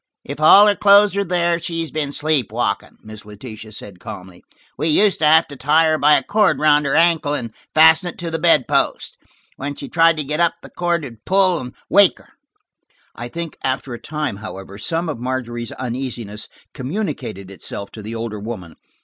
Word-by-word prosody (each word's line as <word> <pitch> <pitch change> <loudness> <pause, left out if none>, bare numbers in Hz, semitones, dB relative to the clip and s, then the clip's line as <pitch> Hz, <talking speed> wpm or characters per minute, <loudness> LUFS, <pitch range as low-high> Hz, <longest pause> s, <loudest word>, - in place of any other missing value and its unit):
"If - - -7
all 195 +7 +8
her 205 -1 +3
clothes 200 -1 +5
are 200 - +1
there 175 -2 0
she's 165 -1 -4
been 150 -2 -2
sleep 150 -5 0
walking," - - -3
Miss 110 0 -11
Letitia 110 +1 -10
said 100 -3 -8
calmly. 95 -2 -10 0.3
"We 150 +5 -2
used 195 +6 +3
to 155 - +2
have 160 +2 +6
to 140 - -9
tie 150 +5 +3
her 155 - 0
by 150 +1 +5
a - - +1
cord 210 -1 +2
around 150 -1 +3
her 135 - 0
ankle 160 -3 +3
and 115 -5 -5 0.2
fasten 160 +3 +6
it - - -11
to 170 -1 -5
the 165 - -2
bedpost. - - +1 0.4
When 140 +1 -5
she 140 - -8
tried 165 +1 +3
to 150 - -1
get 150 +3 -3
up 170 -1 +2
the - - -12
cord 175 -2 -1
would 115 -5 -10
pull 185 -2 +3
and 125 0 -8
wake 200 0 +5
her." - - -20 0.9
I 120 - -6
think 170 +5 -7
after 130 -1 -2
a 120 - -8
time, 150 -9 -4
however, 100 -1 -9
some 165 +8 -2
of 150 -7 -4
Margery's 120 -2 -4
uneasiness 120 -4 -5 0.3
communicated 130 - -5
itself 100 +2 -7
to 110 - -10
the 110 +2 -7
older 115 -2 -5
woman. 100 -6 -8
145 Hz, 195 wpm, -19 LUFS, 115-165 Hz, 0.9 s, all